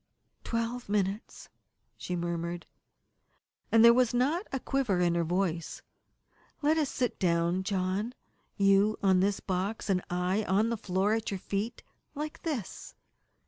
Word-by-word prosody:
"Twelve 230 0 -3
minutes," 205 +1 -2 0.5
she 180 - -4
murmured, 170 0 -3 1.1
and 225 0 +7
there 235 - +9
was 245 -1 +2
not 300 - +1
a 270 - -1
quiver 250 -9 0
in 175 -1 +3
her 170 0 +1
voice. 175 -1 -2 0.8
"Let 305 +2 +4
us 295 - +1
sit 250 -2 -2
down, 170 0 +1
John 195 +4 -1 0.4
you 200 +2 +4
on 190 -2 +4
this 195 +1 +1
box, 195 +3 -2
and 180 -1 +2
I 180 +4 0
on 210 +4 +2
the 235 - 0
floor, 200 -1 0
at 225 0 -1
your 195 - -2
feet 205 +6 -3 0.3
like 300 +1 -5
this." 280 - -5
200 Hz, 140 wpm, -30 LUFS, 180-235 Hz, 1.1 s, there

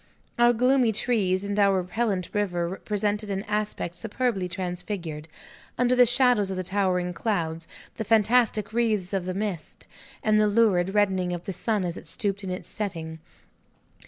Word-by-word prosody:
Our 240 0 +6
gloomy 250 0 +3
trees 200 -4 +1
and 205 +1 -2
our 200 -1 +4
repellent 185 0 -2
river 180 -3 -2
presented 210 0 -1
an 195 0 -2
aspect 210 -5 -2
superbly 225 -2 -1
transfigured, 175 -3 -4 0.5
under 250 0 +3
the 250 -1 +6
shadows 245 -4 +3
of 190 - -3
the 185 - -2
towering 185 -2 0
clouds, 165 -5 -2 0.3
the 220 - -2
fantastic 220 0 +2
wreaths 215 -5 0
of 190 -2 -1
the 185 - -3
mist, 195 -6 -5 0.4
and 215 -1 +3
the 210 - +4
lurid 200 -3 +2
reddening 190 -3 +2
of 175 -1 -5
the 195 - -4
sun 210 +1 -1
as 175 -1 -3
it - - -11
stooped 195 +4 -2
to 195 -2 -6
its 180 0 -5
setting. 165 -6 -5
200 Hz, 160 wpm, -26 LUFS, 180-220 Hz, 0.5 s, Our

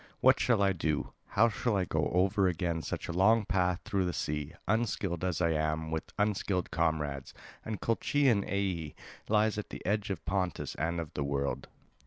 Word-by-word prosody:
What - - +5
shall 115 -5 +3
I 100 -1 +3
do, 80 -3 -1
how 115 +3 +4
shall 110 0 0
I 95 - +1
go 80 -3 0
over 95 +2 +3
again 85 -1 -1
such 70 - -4
a - - -2
long 105 +5 +4
path 90 -1 +1
through 95 -2 0
the 90 - -1
sea, 75 +1 -3
unskilled 100 -6 0
as 90 -1 0
I 85 -1 +3
am, 80 0 -1
with 80 -1 -3
unskilled 100 -3 0
comrades? 75 -4 -1 0.3
And 110 -2 -4
Colchian 120 -1 +2
Aea 95 -7 -2 0.3
lies 105 0 +3
at 105 - -7
the - - -8
edge 100 +1 0
of 90 -5 -4
Pontus 95 0 -1
and 85 +3 -1
of 80 -2 -6
the 75 - -2
world." 70 0 -2
90 Hz, 185 wpm, -31 LUFS, 80-100 Hz, 0.3 s, What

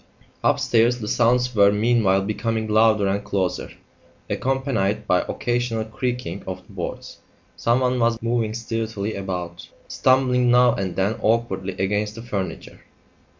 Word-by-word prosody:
Upstairs, 120 +1 +3
the 105 - -5
sounds 125 +2 +2
were 100 -2 +5
meanwhile 105 -3 +2
becoming 110 +2 -2
louder 110 -1 +3
and 100 +1 0
closer, 100 -3 -2 0.6
accompanied 120 -6 -1
by 90 - +3
occasional 120 -2 -1
creaking 120 -1 -4
of 95 -1 -6
the - - -17
boards. - - -6 0.4
Someone 125 +1 +1
was 115 -1 +2
moving 115 -1 -1
stealthily 110 -2 -3
about, 90 -3 -5 0.2
stumbling 125 -1 +2
now 125 0 +5
and 95 -5 -3
then 100 +3 0
awkwardly 105 -4 0
against 105 +3 -1
the 115 - -8
furniture. 95 -7 -5
110 Hz, 130 wpm, -22 LUFS, 100-120 Hz, 0.6 s, were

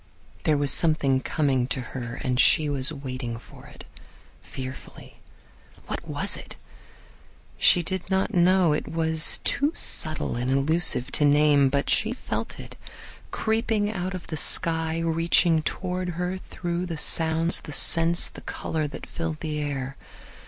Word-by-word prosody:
There 155 -2 +2
was 145 -1 +2
something 145 -5 +2
coming 135 -5 0
to 130 - -3
her 120 -2 -6
and 125 -1 -1
she 155 +3 +4
was 140 0 0
waiting 130 -5 -6
for 115 - -15
it, - - -13 0.6
fearfully. 130 0 -10 0.7
What - - -6
was - - 0
it? - - -6 1.0
She 175 - +4
did 190 +1 -3
not 190 0 0
know; 180 -2 +3
it 150 - -3
was 160 -1 +1
too 285 +2 0
subtle 155 -5 -2
and 125 +2 -3
elusive 140 0 +3
to - - +2
name. 145 -1 +4
But 140 +1 -1
she 220 +2 +1
felt 255 - -6
it, - - -10 0.5
creeping 220 -2 -1
out 185 -2 -4
of 185 - -8
the 160 - -6
sky, 160 +1 +1
reaching 165 0 +2
toward 180 +2 -3
her 180 +1 -3
through 175 -1 -5
the 165 -2 -5
sounds, 160 +2 +3
the - - -10
scents, 165 +3 +5
the - - -12
color 155 -2 -4
that 145 - -9
filled 165 -2 -6
the 155 -1 -4
air. 140 -2 -4
160 Hz, 150 wpm, -24 LUFS, 140-175 Hz, 1.0 s, scents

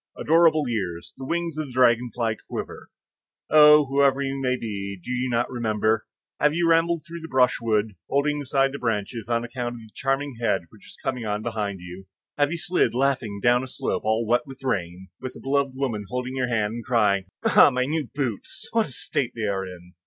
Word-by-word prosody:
adorable 160 -2 +4
years! 95 -8 -3
the 135 - -7
wings 170 -1 -2
of 155 - -3
the 130 - -11
dragonfly 120 -2 +2
quiver. - - -6 0.6
Oh, 150 0 +8
whoever 140 0 +3
you 135 0 -2
may 130 -1 +1
be, 100 -4 -5
do 105 - -7
you 125 +1 -1
not 120 0 +1
remember? 110 -2 0 0.3
Have 150 +1 +3
you 170 0 +2
rambled 165 0 +2
through 170 0 -8
the 165 - -8
brushwood, 115 -6 +2 0.2
holding 145 +1 +1
aside 135 0 +1
the 140 - -6
branches, 115 0 -2
on 115 0 +1
account 120 0 -4
of 115 - -10
the 110 -1 -15
charming 135 0 -1
head 100 -5 +1
which 110 - -17
is - - -14
coming 125 -3 -2
on 105 +1 -2
behind 105 -5 -3
you? 90 +2 -10 0.3
Have 145 0 +2
you 170 - -2
slid, 175 -6 +1
laughing, 125 -6 0
down 120 +1 +4
a - - -6
slope 130 - -2
all 110 +2 +1
wet 120 +3 +1
with 135 0 -11
rain, 95 -6 -3
with 130 -1 -6
a - - -10
beloved 140 0 0
woman 120 -7 -2
holding 125 +1 -3
your 130 -1 0
hand, 110 -3 0
and 120 0 -6
crying, 105 -6 +2 0.2
"Ah, - - +7
my 125 0 0
new 150 -1 -2
boots! 130 -8 -4
what 225 -4 +2
a - - -11
state 125 0 -2
they 115 - -4
are 95 -2 -1
in!" 90 -1 -12
125 Hz, 205 wpm, -24 LUFS, 110-140 Hz, 0.6 s, Oh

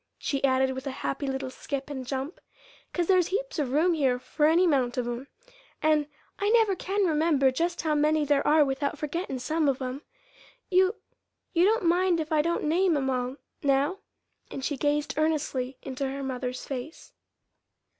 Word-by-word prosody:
she 275 -1 -2
added, 265 -1 +3
with 260 +1 -6
a 265 - -6
happy 275 +1 -2
little 265 -1 -3
skip 275 +1 -5
and 265 -3 -6
jump, 270 +4 -4 0.5
"'cause 350 - 0
there's 365 -1 +3
heaps - - -3
of 275 -4 -1
room 325 +6 +3
here 270 -6 +2
for 295 +4 0
any 340 +4 +4
'mount 260 -7 +1
of 250 - 0
'em. 240 +3 -4 0.5
And 305 -1 +2 0.3
I 405 - +1
never 445 -3 +4
can 390 +2 0
remember 305 -5 +3
just 340 +6 -1
how 315 -1 +1
many 300 +1 +2
there 285 -1 +2
are 300 0 +5
without 275 +1 -2
forgettin' 300 -1 -3
some 305 +4 0
of 265 - 0
'em. 260 +1 -4 0.7
You 375 +3 +4 0.6
you 345 0 +4
don't 435 -1 +2
mind 350 0 +3
if 315 0 -4
I 310 -1 +4
don't 340 +2 -1
name 335 +1 +2
'em 265 -1 0
all 250 0 -2 0.3
now?" 280 +7 +1 0.5
And 270 - -5
she 290 - -1
gazed 295 +2 0
earnestly 280 -5 -1
into 270 0 -3
her 275 +1 -5
mother's 255 -1 -4
face. 275 +4 -7
295 Hz, 180 wpm, -27 LUFS, 265-335 Hz, 0.7 s, are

